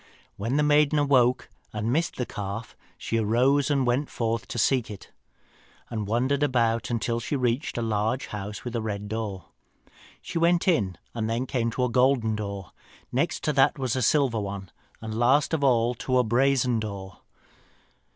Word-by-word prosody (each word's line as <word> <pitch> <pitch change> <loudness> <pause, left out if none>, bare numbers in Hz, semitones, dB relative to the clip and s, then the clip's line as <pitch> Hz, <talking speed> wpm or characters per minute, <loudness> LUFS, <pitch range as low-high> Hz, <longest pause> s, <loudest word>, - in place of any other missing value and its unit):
When 115 +7 -1
the 150 - +3
maiden 150 0 +4
awoke 130 -4 +3 0.2
and 110 +3 -2
missed 165 +3 0
the 125 - -2
calf, 105 +1 -6 0.2
she 115 - -1
arose 125 +7 +2
and 140 -3 +2
went 125 +4 0
forth 115 -1 -2
to - - -6
seek 125 +1 +2
it, 100 -3 -10 0.8
and 110 -3 -3
wandered 130 +6 +1
about 120 -4 +1
until 115 0 -1
she 120 - -3
reached 125 +1 -1
a 120 - -1
large 110 +3 0
house 105 0 -6
with 120 -1 -4
a 115 - 0
red 105 -1 -4
door. 105 -4 -5 0.7
"She 165 - -4
went 170 +3 +3
in, 100 - +2 0.2
and 110 -2 -2
then 115 +3 -1
came 120 -3 -1
to 125 - -1
a 125 - +1
golden 125 -3 +3
door, 100 -3 -5 0.4
next - - -1
to - - +1
that - - +4
to 135 - -6
a 130 - -1
silver 130 0 +2
one, 100 -2 -5 0.3
and 110 -1 -5
last 130 +7 +3
of 155 -3 0
all 120 -3 +3
to 130 +2 -1
a 125 - +4
brazen 125 0 +2
door. 100 -3 -6
120 Hz, 180 wpm, -26 LUFS, 110-130 Hz, 0.8 s, maiden